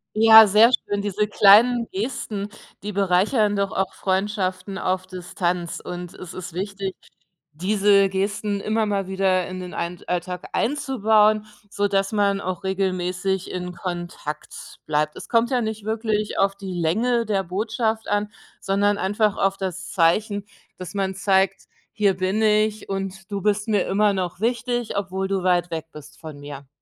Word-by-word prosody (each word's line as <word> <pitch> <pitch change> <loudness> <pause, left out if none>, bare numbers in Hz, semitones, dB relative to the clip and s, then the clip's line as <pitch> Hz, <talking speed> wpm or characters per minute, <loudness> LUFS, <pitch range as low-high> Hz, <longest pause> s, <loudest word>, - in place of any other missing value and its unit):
Ja, 220 0 +9
sehr 215 +5 +6
schön. 205 -3 0
Diese 210 +1 0
kleinen 225 +4 +5
Gesten, 210 -1 -4 0.3
die 210 +1 -5
bereichern 200 +3 +2
doch 200 -1 -1
auch 190 -1 -2
Freundschaften 190 -1 -2
auf 185 0 -1
Distanz. 180 -1 -3
Und 175 -1 -7
es 180 - -9
ist 180 -2 -8
wichtig, 195 0 -4 0.6
diese 200 +3 +3
Gesten 200 +1 -2
immer 215 +1 0
mal 200 -2 -1
wieder 190 -2 +1
in 185 0 -6
den 180 -1 -7
ein 170 0 -4
Alltag 180 0 -3
einzubauen, 215 -6 +2 0.2
sodass 200 -1 0
man 200 -1 +1
auch 185 -1 -4
regelmäßig 190 0 -1
in 180 0 -4
Kontakt 175 -4 -7
bleibt. 150 0 0
Es - - -10
kommt 235 +1 +2
ja 250 -2 +2
nicht 220 -1 -4
wirklich 215 -1 -1
auf 195 0 +2
die 195 -2 -7
Länge 225 +8 +1
der 195 -2 0
Botschaft 220 +4 -2
an, 205 0 -1 0.3
sondern 200 +1 +1
einfach 205 +2 0
auf 195 0 +1
das 185 -1 -5
Zeichen, 200 +4 +1 0.3
dass 185 +2 -8
man 190 -1 -1
zeigt: 195 0 +1 0.3
„Hier 205 -4 +1
bin 190 +4 0
ich 215 -1 +1
und 195 0 -5
du 200 -1 -3
bist 210 +1 0
mir 205 -3 +1
immer 205 +1 +2
noch 180 -1 -3
wichtig, 240 0 -1
obwohl 190 -1 -2
du 195 -2 -1
weit 175 -1 +2
weg 160 -1 -4
bist 150 0 -13
von 155 -3 -9
mir.“ 145 -1 -9
195 Hz, 155 wpm, -23 LUFS, 185-210 Hz, 0.6 s, Ja